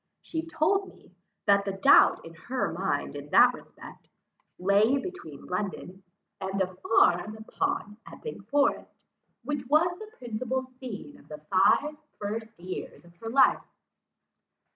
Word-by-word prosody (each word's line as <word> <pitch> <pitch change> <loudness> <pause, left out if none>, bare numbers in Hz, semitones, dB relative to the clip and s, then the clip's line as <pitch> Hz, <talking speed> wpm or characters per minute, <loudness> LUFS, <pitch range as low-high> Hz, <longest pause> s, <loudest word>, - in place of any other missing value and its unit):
She 320 - -3
told 385 +5 +1
me, - - -18 0.3
that 200 -1 +4
the 195 -1 -3
doubt 195 0 +5
in 165 - -10
her 250 +10 -3
mind - - -2
in - - -8
that - - +6
respect, - - -13 0.5
lay 200 +8 +3
between 270 - -8
London, 190 0 -4 0.4
and 190 +1 -3
a 185 -1 0
farm 185 +1 +2
upon 300 - -3
Epping 460 - -8
Forest, 285 0 +1 0.5
which 290 -4 -3
was 325 +5 +3
the 435 0 -10
principal 250 +2 -3
scene 255 +1 -9
of - - -20
the 150 - -8
five 245 +10 +4 0.2
first 220 +1 -5
years 180 -1 -7
of 170 0 -19
her 225 +5 -6
life. 265 +4 +4
225 Hz, 140 wpm, -28 LUFS, 195-290 Hz, 0.5 s, that